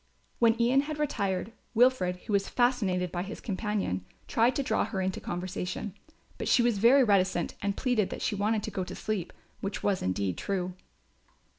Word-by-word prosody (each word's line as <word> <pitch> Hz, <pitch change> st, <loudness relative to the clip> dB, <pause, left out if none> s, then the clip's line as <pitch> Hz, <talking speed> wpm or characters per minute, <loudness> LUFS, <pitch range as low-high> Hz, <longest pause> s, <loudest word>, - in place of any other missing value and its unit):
When 230 Hz, -1 st, +4 dB
Ian 250 Hz, +4 st, +4 dB
had 300 Hz, +1 st, -5 dB
retired, 200 Hz, -9 st, -1 dB, 0.2 s
Wilfred, 240 Hz, -7 st, +4 dB
who 210 Hz, -, -3 dB
was 200 Hz, -1 st, +2 dB
fascinated 200 Hz, -8 st, +1 dB
by 175 Hz, -, -2 dB
his 190 Hz, -, -6 dB
companion, 200 Hz, -, -2 dB, 0.2 s
tried 240 Hz, +3 st, +3 dB
to 280 Hz, -, 0 dB
draw -, -, +1 dB
her 195 Hz, -, -3 dB
into 185 Hz, 0 st, -2 dB
conversation; 185 Hz, +2 st, -4 dB, 0.5 s
but -, -, -3 dB
she 240 Hz, -, +5 dB
was 235 Hz, -4 st, +2 dB
very 255 Hz, +6 st, +6 dB
reticent 190 Hz, -5 st, +2 dB
and 200 Hz, 0 st, -1 dB
pleaded 245 Hz, -7 st, +1 dB
that -, -, -5 dB
she -, -, 0 dB
wanted 210 Hz, +1 st, 0 dB
to -, -, -4 dB
go 190 Hz, -, -2 dB
to -, -, -7 dB
sleep, 210 Hz, -5 st, -3 dB, 0.3 s
which 200 Hz, +1 st, -4 dB
was 200 Hz, -2 st, +1 dB
indeed 95 Hz, -1 st, -1 dB
true. 185 Hz, -2 st, -2 dB
200 Hz, 180 wpm, -29 LUFS, 185-235 Hz, 0.5 s, very